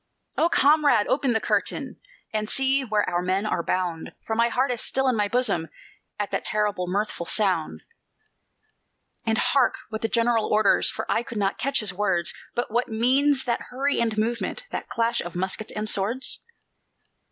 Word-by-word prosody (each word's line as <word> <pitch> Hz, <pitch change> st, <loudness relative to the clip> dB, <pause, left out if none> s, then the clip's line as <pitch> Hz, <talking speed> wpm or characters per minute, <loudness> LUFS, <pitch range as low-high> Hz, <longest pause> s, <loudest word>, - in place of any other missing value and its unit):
"O 335 Hz, -, +2 dB
comrade, 285 Hz, -8 st, +4 dB
open 265 Hz, -2 st, +1 dB
the 225 Hz, -, +2 dB
curtain, -, -, -1 dB, 0.4 s
And 215 Hz, 0 st, -1 dB
see 270 Hz, 0 st, +3 dB
where 215 Hz, -4 st, 0 dB
our 175 Hz, -1 st, 0 dB
men 185 Hz, +3 st, 0 dB
are 210 Hz, -, 0 dB
bound, 175 Hz, -2 st, -2 dB
For 220 Hz, -, -2 dB
my 235 Hz, +1 st, +3 dB
heart 255 Hz, +2 st, +1 dB
is 240 Hz, -, -2 dB
still 270 Hz, 0 st, 0 dB
in 255 Hz, -, +2 dB
my 210 Hz, -1 st, +1 dB
bosom 200 Hz, -8 st, 0 dB, 0.5 s
At 205 Hz, -1 st, -3 dB
that -, -, -1 dB
terrible, 205 Hz, -4 st, -1 dB
mirthful 190 Hz, -2 st, -2 dB
sound. 165 Hz, -, 0 dB, 1.4 s
"And 220 Hz, 0 st, +2 dB
hark 270 Hz, 0 st, +3 dB
what 220 Hz, 0 st, -5 dB
the 225 Hz, -, +1 dB
General 230 Hz, -1 st, +2 dB
orders, 210 Hz, -1 st, +3 dB
For -, -, -3 dB
I -, -, +1 dB
could 235 Hz, -1 st, -7 dB
not 195 Hz, -1 st, 0 dB
catch 275 Hz, -1 st, 0 dB
his 205 Hz, -3 st, -3 dB
words; 185 Hz, -3 st, +1 dB, 0.2 s
But 240 Hz, -2 st, -2 dB
what 240 Hz, +2 st, +1 dB
means 265 Hz, +5 st, +2 dB
that 240 Hz, -2 st, -2 dB
hurry 275 Hz, +2 st, 0 dB
and 225 Hz, -2 st, 0 dB
movement, 235 Hz, -, -1 dB
That -, -, -5 dB
clash 235 Hz, +1 st, 0 dB
of 175 Hz, 0 st, -7 dB
muskets 190 Hz, +4 st, -3 dB
and 215 Hz, 0 st, -3 dB
swords?" 220 Hz, +6 st, +1 dB
220 Hz, 175 wpm, -25 LUFS, 200-250 Hz, 1.4 s, comrade